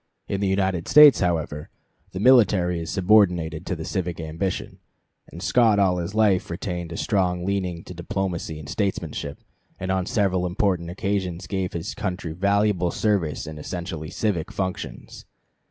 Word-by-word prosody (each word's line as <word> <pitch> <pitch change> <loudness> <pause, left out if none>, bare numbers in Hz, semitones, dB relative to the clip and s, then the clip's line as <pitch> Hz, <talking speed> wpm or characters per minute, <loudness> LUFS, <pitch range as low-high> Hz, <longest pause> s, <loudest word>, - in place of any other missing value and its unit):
In 100 - -2
the 100 - +1
United 95 -3 0
States, 150 -4 +8
however, 80 -5 -1 0.4
the 95 - -5
military 100 -7 +4
is 80 - -5
subordinated 90 -5 +2
to 90 - -1
the 80 -1 -6
civic 90 -4 -3
ambition, 80 +4 -4 0.5
and 85 +3 -9
Scott 110 +2 +4
all 95 -3 +3
his 90 +4 -4
life 100 -4 +3
retained 85 -1 -4
a 85 - -5
strong 90 -4 0
leaning 90 -3 -2
to - - -9
diplomacy 85 -2 -3
and 75 -2 -9
statesmanship, 85 -8 -3 0.4
and 95 0 -2
on 95 -1 0
several 95 -4 +1
important 90 -2 0
occasions 95 -2 -2
gave 95 -2 -3
his 85 +8 -4
country 90 -5 -4
valuable 100 0 +1
service 95 -8 0
in 75 -1 -8
essentially 85 -1 -5
civic 100 -8 -2
functions. 95 -2 -5
90 Hz, 155 wpm, -24 LUFS, 85-100 Hz, 0.5 s, States